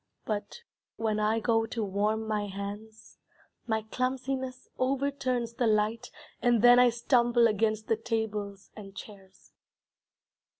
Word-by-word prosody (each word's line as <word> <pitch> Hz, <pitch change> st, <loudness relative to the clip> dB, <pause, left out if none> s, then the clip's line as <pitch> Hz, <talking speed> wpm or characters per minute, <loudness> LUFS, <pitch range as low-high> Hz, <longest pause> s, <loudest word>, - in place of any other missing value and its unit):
But 215 Hz, -, -4 dB, 0.3 s
when 215 Hz, -1 st, -1 dB
I 215 Hz, +1 st, +2 dB
go 225 Hz, 0 st, +1 dB
to 225 Hz, 0 st, -3 dB
warm 210 Hz, +2 st, 0 dB
my 210 Hz, -1 st, -1 dB
hands, 205 Hz, +3 st, -8 dB, 0.5 s
My 220 Hz, -1 st, 0 dB
clumsiness 255 Hz, +2 st, -3 dB
overturns 255 Hz, -3 st, -1 dB
the 240 Hz, 0 st, 0 dB
light, 220 Hz, +2 st, +1 dB, 0.3 s
And 240 Hz, -2 st, +3 dB
then 245 Hz, 0 st, +8 dB
I 250 Hz, 0 st, +7 dB
stumble 240 Hz, 0 st, +3 dB
Against 215 Hz, 0 st, 0 dB
the 225 Hz, -, +2 dB
tables 210 Hz, -3 st, -3 dB
and 195 Hz, -2 st, -11 dB
chairs. 195 Hz, -2 st, -13 dB
225 Hz, 125 wpm, -29 LUFS, 210-245 Hz, 0.5 s, then